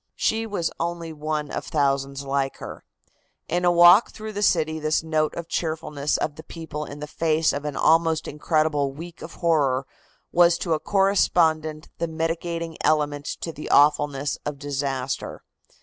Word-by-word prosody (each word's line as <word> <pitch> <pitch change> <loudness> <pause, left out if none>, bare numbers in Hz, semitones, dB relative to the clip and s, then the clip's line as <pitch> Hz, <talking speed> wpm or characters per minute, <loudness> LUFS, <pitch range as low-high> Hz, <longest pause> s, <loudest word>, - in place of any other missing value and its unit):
She 225 +1 0
was 190 -6 -2
only 170 -1 -3
one 150 -1 -3
of - - -3
thousands 140 -1 0
like 135 0 -1
her. - - -9 0.6
In 175 +2 -1
a 175 - +4
walk 175 +5 +7
through 215 0 -8
the 205 - -3
city 160 -5 +2
this 155 +1 0
note 155 -1 0
of 170 -1 -6
cheerfulness 150 -4 -2
of 150 - -3
the 160 - -9
people 160 -2 -7
in 145 0 -9
the - - -3
face 160 +1 +1
of 145 +1 -4
an 145 -2 -3
almost 160 0 +2
incredible 150 -2 0
week 165 +4 -10
of - - -9
horror 140 -6 +1 0.5
was 170 0 +5
to 170 -2 -1
a 155 - 0
correspondent 160 -5 +1
the 170 - 0
mitigating 165 +1 -3
element 145 -1 +1
to 165 - -3
the 150 -1 -8
awfulness 145 -1 +3
of 150 -1 -4
disaster. 135 -2 -3
155 Hz, 165 wpm, -24 LUFS, 145-170 Hz, 0.6 s, walk